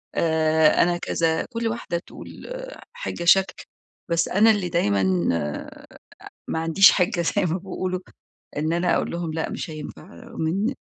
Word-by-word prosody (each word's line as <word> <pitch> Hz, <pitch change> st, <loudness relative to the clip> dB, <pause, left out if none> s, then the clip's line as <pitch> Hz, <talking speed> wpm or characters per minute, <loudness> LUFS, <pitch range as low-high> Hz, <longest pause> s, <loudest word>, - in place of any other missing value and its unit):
آآ، 160 Hz, -1 st, +3 dB
أنا 175 Hz, 0 st, +1 dB
كذا، 165 Hz, -2 st, 0 dB
كل 230 Hz, -1 st, -3 dB
واحدة 225 Hz, -6 st, -3 dB
تقول -, -, -11 dB, 0.6 s
حاجة 485 Hz, -, -5 dB
شكل، 190 Hz, +2 st, +3 dB, 0.5 s
بس 170 Hz, 0 st, +1 dB
أنا 215 Hz, +4 st, +5 dB
اللي 200 Hz, -4 st, -1 dB
دايمًا 100 Hz, -, +1 dB
آآ، 75 Hz, -3 st, -5 dB, 0.6 s
ما 160 Hz, -, -2 dB
عنديش 165 Hz, +5 st, +6 dB
حاجة 180 Hz, -2 st, +1 dB
زي 170 Hz, -, +1 dB
ما 175 Hz, +1 st, 0 dB
بيقولوا 185 Hz, -1 st, -4 dB, 0.6 s
إن 155 Hz, +2 st, 0 dB
أنا 175 Hz, +1 st, +2 dB
أقول -, -, -1 dB
لهم 170 Hz, -2 st, -4 dB
لأ 160 Hz, 0 st, -2 dB
مش -, -, -5 dB
هينفع، 155 Hz, -1 st, -8 dB
رغم 230 Hz, -5 st, -6 dB
إن 200 Hz, -, 0 dB
170 Hz, 155 wpm, -23 LUFS, 160-190 Hz, 0.6 s, عنديش